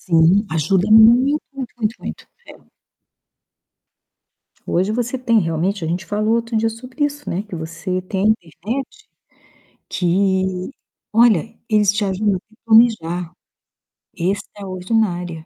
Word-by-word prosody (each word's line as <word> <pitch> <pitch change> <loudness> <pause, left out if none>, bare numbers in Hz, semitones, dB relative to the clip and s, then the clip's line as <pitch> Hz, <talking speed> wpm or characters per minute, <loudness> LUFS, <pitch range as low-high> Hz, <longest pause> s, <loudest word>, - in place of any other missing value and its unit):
Sim. 175 +4 +3
Ajuda 175 +6 +1
muito, 240 +7 +6
muito, 260 -3 -6
muito, 220 0 -1
muito. - - -8 0.2
É. - - -11 2.1
Hoje 190 +5 0
você 245 +2 -2
tem, 230 -3 +2
realmente, 170 +2 -1
a - - -2
gente 180 +3 -2
falou 215 +3 0
outro 230 -1 -1
dia 225 +1 +2
sobre 255 +6 -4
isso, 290 0 -4
né, 185 +4 -2
que 210 -3 -10
você 170 +3 -4
tem 190 +1 -3
a - - +5
internet, 230 - -5 0.8
que 190 +1 0 0.4
olha, 225 -2 +3
eles 210 -2 +3
te 205 0 -1
ajudam 195 +1 0
até 220 +4 -13
planejar. 200 -7 +3 0.9
Extraordinário. 185 -2 -2
205 Hz, 125 wpm, -19 LUFS, 180-225 Hz, 2.1 s, muito